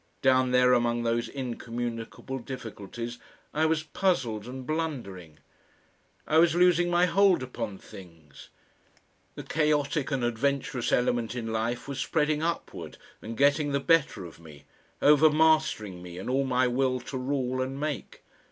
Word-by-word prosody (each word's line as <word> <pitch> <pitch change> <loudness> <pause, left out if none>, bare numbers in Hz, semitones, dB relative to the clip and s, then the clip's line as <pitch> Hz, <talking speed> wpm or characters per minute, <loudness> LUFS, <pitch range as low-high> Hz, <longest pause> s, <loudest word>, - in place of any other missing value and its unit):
Down 130 -1 +4
there 125 0 +4
among 120 -1 +1
those 115 0 0
incommunicable 120 0 -5
difficulties, 120 -1 -7 0.3
I 155 +1 +2
was 160 -1 0
puzzled 130 - -1
and 130 0 -7
blundering. 120 - -4 0.9
I 155 - +3
was 165 0 +4
losing 175 -1 +4
my 175 +1 +4
hold 185 -4 +3
upon 115 -5 -5
things; 80 -8 -14 0.9
the - - -7
chaotic 150 -1 0
and 135 -4 -1
adventurous 130 +2 -1
element 120 -2 +1
in 115 -2 -4
life 120 +3 -2
was 140 -1 -5
spreading 150 -1 0
upward 170 +1 -4 0.2
and 115 +1 -7
getting 145 +1 +3
the 140 - +2
better 150 - +2
of 85 - -12
me, 75 -3 -14 0.4
over 150 +1 +7
mastering 155 - +2
me 90 -1 -9
and 95 +7 -4
all 135 +1 +1
my 130 -1 +2
will 130 +1 +1
to 135 - -6
rule 130 -1 -1
and 135 +1 -3
make.... 150 -2 -5
130 Hz, 145 wpm, -28 LUFS, 115-150 Hz, 0.9 s, over